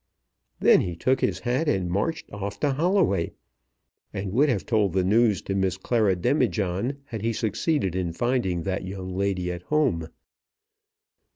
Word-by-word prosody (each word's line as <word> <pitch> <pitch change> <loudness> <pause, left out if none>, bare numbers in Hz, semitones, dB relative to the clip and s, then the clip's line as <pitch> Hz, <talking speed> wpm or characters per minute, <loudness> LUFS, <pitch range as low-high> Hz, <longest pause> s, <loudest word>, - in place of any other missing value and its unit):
Then - - +6
he 90 -2 -3
took 130 +9 +1
his - - +1
hat 130 +6 0
and 95 -9 0
marched 110 - -2
off 100 0 -5
to 145 -2 +2
Holloway, 160 - +1 0.8
and 95 -2 -4
would 140 +8 +3
have 110 -7 0
told 105 -6 +1
the 95 -1 +2
news 105 0 +3
to 95 - -3
Miss 95 -1 0
Clara 105 -1 +1
Demijohn 110 - 0
had 115 -6 -6
he 115 +2 0
succeeded 110 - -1
in 90 -2 -1
finding 95 -4 0
that 95 +1 -2
young 95 -1 -6
lady 95 -2 -1
at 90 0 -6
home. 125 - 0
100 Hz, 160 wpm, -25 LUFS, 95-125 Hz, 0.8 s, Then